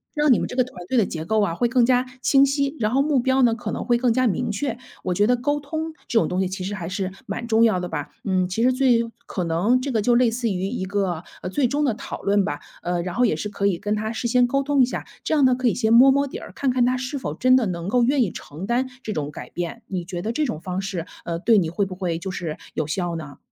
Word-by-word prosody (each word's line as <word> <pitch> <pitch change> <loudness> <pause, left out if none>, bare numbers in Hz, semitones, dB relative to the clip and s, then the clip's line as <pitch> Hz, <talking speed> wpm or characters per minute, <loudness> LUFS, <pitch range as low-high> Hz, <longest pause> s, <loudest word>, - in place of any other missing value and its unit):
让 295 -3 +4
你 - - +3
们 - - -2
这 - - -6
个 255 - +4
团 180 -9 -11
队 260 - 0
的 220 - +4
结 160 -3 -5
构 215 +5 +1
啊， 195 -5 0
会 240 +6 +1
更 250 -1 +4
加 250 0 +3 0.2
清 275 0 +5
晰， 280 +1 0
然 215 0 +1
后 270 +3 +3
目 285 -3 +2
标 260 +1 +2
呢， 235 -2 +4
可 240 - -5
能 - - -4
会 240 -1 +3
更 245 0 +2
加 255 +2 +2
明 235 +3 -1
确。 235 +3 -2 0.3
我 180 - 0
觉 205 +4 +3
得 245 +1 +3
沟 290 +4 -1
通 315 +3 -4 0.2
这 230 - +4
种 - - +1
东 180 +1 -1
西 185 - 0
其 185 0 -5
实 200 - -3
还 175 -4 -5
是 190 -1 -3
蛮 235 - -4
重 225 0 +4
要 220 -5 +3
的 180 - -3
吧。 - - -4 0.2
嗯， 185 -2 +1
其 225 +5 -1
实 255 +1 +4
最 245 -3 +3 0.2
可 185 - -3
能 175 +10 +2
这 270 +2 -3
个 225 -3 +1
就 240 +3 +3
类 240 -1 +4
似 235 0 -1
于 190 -1 -1
一 215 -4 -3
个， 190 -4 -1 0.2
呃， - - -3
最 260 +6 +1
终 290 +4 0
的 255 - +2
讨 - - -7
论 200 0 +3
吧。 145 - -3 0.2
呃， 175 0 -1
然 180 0 -4
后 250 - +3
也 210 - +2
是 160 - -4
可 200 -1 -1
以 190 -4 +1
跟 205 +4 -2
他 215 +1 -2
事 235 +1 -2
先 245 +1 +4
沟 275 +3 +1
通 285 -1 +2
一 - - +7
下， 250 - -5 0.2
这 - - 0
样 290 -3 +4
呢 255 - +5
可 255 0 0
以 - - +2
先 225 -2 +2
摸 250 +4 +8
摸 280 +1 +2
底 - - -7
儿， - - -10
看 270 -2 +1
看 250 -1 +2
他 255 +1 +2
是 260 +3 -4
否 - - -4
真 255 0 +4
的 250 -4 +3
能 170 -1 -4
够 245 +3 +3
愿 265 +2 +3
意 195 - -2
承 155 +6 -8
担 245 +4 0 0.2
这 220 - -3
种 145 -4 -3
改 150 - -9
变， 175 +7 -5
你 185 -3 -3
觉 175 0 -5
得 220 - -1
这 300 +6 0
种 155 - -3
方 185 +1 -3
式， 190 -4 -4 0.2
呃， 170 -1 -2
对 220 +3 +4
你 165 -4 0
会 200 +4 0
不 190 - -7
会 180 -3 -2
就 190 +2 -5
是 170 -4 -4 0.2
有 155 - -2
效 175 +1 -2
呢？ 150 -4 -8
225 Hz, 325 characters per minute, -23 LUFS, 185-255 Hz, 0.3 s, 摸